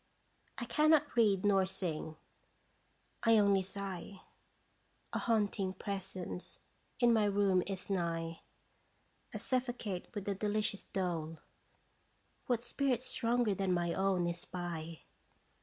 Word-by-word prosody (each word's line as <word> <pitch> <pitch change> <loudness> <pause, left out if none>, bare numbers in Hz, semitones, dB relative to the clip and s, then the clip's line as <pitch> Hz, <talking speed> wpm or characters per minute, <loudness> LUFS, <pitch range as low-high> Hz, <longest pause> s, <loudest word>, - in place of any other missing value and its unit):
1 240 - -4
cannot 300 +1 +4
read 205 -5 +4
nor 195 -2 +5
sing 175 -5 -3 1.1
I 230 -1 +5
only 200 -2 +5
sigh. 195 0 -6 0.9
A - - 0
haunting 205 -4 +1
presence 190 -2 -5 0.4
in 240 -2 +5
my 220 -2 +4
room 200 -2 +3
is 195 -2 -4
nigh; 165 -3 -2 0.9
I - - -4
suffocate 245 -7 -2
with 205 -1 -4
a 200 - +1
delicious 210 0 0
dole. 165 -4 -2 1.1
What 240 -3 +1
spirit 255 0 0
stronger 240 -3 +1
than 195 -1 0
my 170 -1 0
own 190 -2 +1
is 170 0 -2
by? 170 -3 -5
195 Hz, 115 wpm, -34 LUFS, 180-225 Hz, 1.1 s, nor